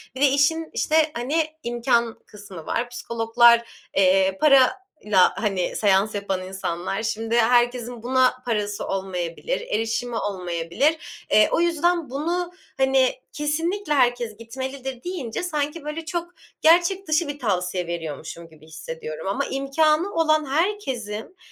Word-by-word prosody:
Bir 260 - -6
de 285 - +7
işin 285 +4 +2
işte, 310 0 +2
hani, 295 +7 0 0.2
imkân 235 -1 0
kısmı 200 -6 -11
var. 240 +1 -2
Psikologlar, 235 0 +2
eee, 190 0 +4
parayla, 275 - +3
hani, 195 -5 -1
seans 205 +1 +2
yapan 195 -2 -2
insanlar. 190 +1 -4
Şimdi 225 +1 -2
herkesin 240 0 +2
buna 255 0 +2
parası 210 -3 -2
olmayabilir, 190 - -3
erişimi 230 - -2
olmayabilir. 185 - -2
Eee, 215 - +5
o - - +2
yüzden 340 -2 +1
bunu, 340 +6 -2 0.3
hani, 265 -1 +3 0.2
kesinlikle 325 +4 -1
herkes 245 -5 +1
gitmelidir 260 +2 -6
deyince 350 -9 -4
sanki 300 -2 -2
böyle 300 +2 -5
çok 345 +1 -4 0.3
gerçek 350 +4 +4
dışı 310 +1 +1
bir 290 0 -5
tavsiye 180 -6 -1
veriyormuşum 165 0 -6
gibi 155 -1 -18
hissediyorum. 155 +1 -7
Ama 195 - -1
imkânı 305 +7 +1
olan 310 -2 +2
herkesin, 275 - -2
245 Hz, 125 wpm, -23 LUFS, 205-310 Hz, 0.3 s, de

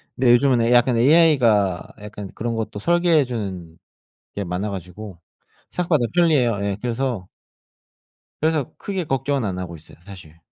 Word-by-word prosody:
근데 125 -1 +3
요즘은 125 0 +4
에 115 +1 +1
약간 120 0 +4
AI가 120 - +3
약간 105 -2 -8
그런 115 +1 -3
것도 110 -2 -4
설계해 170 - +3
주는 95 -9 -6 0.6
게 100 - -4
많아 90 +4 -3
가지고 95 0 -9 0.5
생각보다 165 -8 +1
편리해요. 145 - +3
예 100 -1 -2
그래서 120 -5 -3 1.1
그래서 155 -3 0
크게 190 -3 -4
걱정은 135 -2 -1
안 95 -3 -3
하고 85 -2 -6
있어요 80 - -17
사실. 85 -5 -13
115 Hz, 320 characters per minute, -21 LUFS, 100-140 Hz, 1.1 s, 요즘은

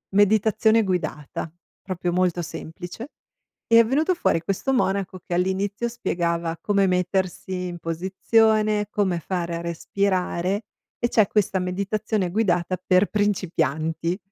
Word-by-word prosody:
"meditazione 220 +2 +4
guidata", 155 -4 -3 0.3
proprio 180 -2 -3
molto 180 -1 +1
semplice. 175 - -7 0.6
È 230 0 +7
venuto 310 +9 +1
fuori 165 - +1
questo 195 +9 -1
monaco, 195 -5 0
che 175 - -4
all'inizio 195 +5 0
spiegava 170 -6 -2
come 200 -2 +2
mettersi 180 0 -1
in 175 -1 -6
posizione, 210 +5 +2
come 190 -5 0
fare 170 0 -3
a - - -5
respirare 185 +3 -1 0.4
e 240 - +1
c'è 215 -5 +4
questa 195 -3 +1
meditazione 195 +1 -1
guidata 185 -3 +1
per 185 +2 +4
principianti. 165 -4 0
185 Hz, 115 wpm, -24 LUFS, 175-210 Hz, 0.6 s, È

